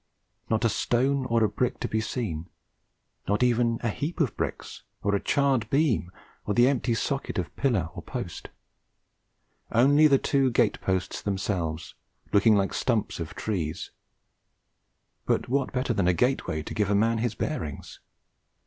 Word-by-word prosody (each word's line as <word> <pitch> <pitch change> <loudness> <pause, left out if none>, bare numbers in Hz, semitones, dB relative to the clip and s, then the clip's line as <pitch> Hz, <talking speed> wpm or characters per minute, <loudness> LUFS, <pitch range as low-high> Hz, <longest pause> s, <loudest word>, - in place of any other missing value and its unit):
Not 110 +1 +1
a - - +4
stone 130 +5 +1
or 115 -2 +2
a - - +4
brick 120 +5 -1
to - - -1
be 110 - -1
seen; 95 -9 -4 0.8
not 105 +4 +2
even 120 -1 +2
a 115 - +1
heap 150 - -4
of 145 -8 +1
bricks, - - -4 0.2
or 100 - +1
a 100 - +2
charred 135 -6 +1
beam, 135 - +1 0.3
or 105 - -2
the 120 +3 +6
empty 125 -3 +1
socket 140 +4 -2
of - - -3
pillar 110 -12 +1
or - - -7
post; - - -6 1.2
only 140 +6 +5
the 140 -2 +5
two 135 -1 +2
gate 120 -2 +1
posts 95 -1 -1
themselves, 90 -5 -2 0.4
looking 105 +2 +5
like 100 -1 +2
the - - -4
stumps 115 -7 0
of 80 -2 -6
trees. 85 -8 -3 1.4
But - - +1
what 135 +1 0
better 130 -1 0
than 100 -5 +1
a 90 - +3
gateway 95 - 0
to - - -7
give 105 -2 0
a 100 - +3
man 115 +2 +2
his 115 -1 -1
bearings? 80 - -4
115 Hz, 165 wpm, -27 LUFS, 100-130 Hz, 1.4 s, the